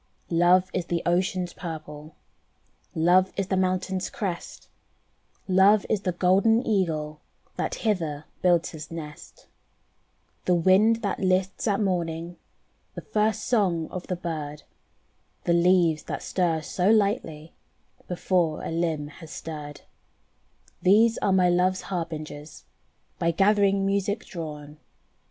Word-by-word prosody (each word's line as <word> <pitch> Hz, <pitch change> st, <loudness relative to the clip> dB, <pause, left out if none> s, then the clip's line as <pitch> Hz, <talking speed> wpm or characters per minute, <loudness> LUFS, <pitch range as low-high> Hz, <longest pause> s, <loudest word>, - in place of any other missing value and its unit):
Love 180 Hz, +2 st, +4 dB
is 180 Hz, -2 st, -2 dB
the 170 Hz, -1 st, -1 dB
ocean's 180 Hz, 0 st, 0 dB
purple, 155 Hz, -2 st, -8 dB, 0.8 s
Love 180 Hz, +3 st, +4 dB
is 195 Hz, -1 st, -2 dB
the 190 Hz, -, +1 dB
mountain's 185 Hz, 0 st, -1 dB
crest, 190 Hz, -6 st, -5 dB, 0.8 s
Love 195 Hz, +2 st, +5 dB
is 210 Hz, -, +1 dB
the 185 Hz, -, -1 dB
golden 195 Hz, +7 st, +3 dB
Eagle 155 Hz, -7 st, -1 dB, 0.3 s
That -, -, -2 dB
hither 160 Hz, -8 st, -1 dB, 0.2 s
builds 175 Hz, -2 st, +3 dB
his 155 Hz, -2 st, -9 dB
nest. 155 Hz, -3 st, -10 dB, 1.0 s
The 180 Hz, -, +3 dB
wind 205 Hz, +7 st, +4 dB
that 200 Hz, -, -1 dB
lists 185 Hz, +3 st, 0 dB
at 200 Hz, -1 st, +1 dB
morning. 175 Hz, -3 st, -2 dB, 0.6 s
The -, -, -6 dB
first 215 Hz, 0 st, 0 dB
song 180 Hz, -9 st, +1 dB
of 185 Hz, -, -6 dB
the 180 Hz, -, -1 dB
bird, 155 Hz, -4 st, -5 dB, 0.8 s
The 170 Hz, -, +2 dB
leaves 170 Hz, -2 st, +3 dB
that -, -, -5 dB
stir 170 Hz, -4 st, 0 dB
so 180 Hz, +5 st, 0 dB
lightly 200 Hz, -8 st, 0 dB, 0.5 s
Before 175 Hz, -3 st, 0 dB
a -, -, -4 dB
limb 165 Hz, -3 st, -1 dB
has 155 Hz, +2 st, -12 dB
stirred: 150 Hz, -3 st, -8 dB, 1.0 s
These 220 Hz, +5 st, +4 dB
are 200 Hz, -, +1 dB
my 185 Hz, -1 st, +4 dB
love's 180 Hz, +1 st, +2 dB
harbingers 155 Hz, -4 st, -6 dB, 0.6 s
By 170 Hz, -, +1 dB
gathering 200 Hz, +1 st, +3 dB
music 200 Hz, +2 st, -1 dB
drawn. 150 Hz, -4 st, -8 dB
180 Hz, 125 wpm, -26 LUFS, 160-195 Hz, 1.0 s, Love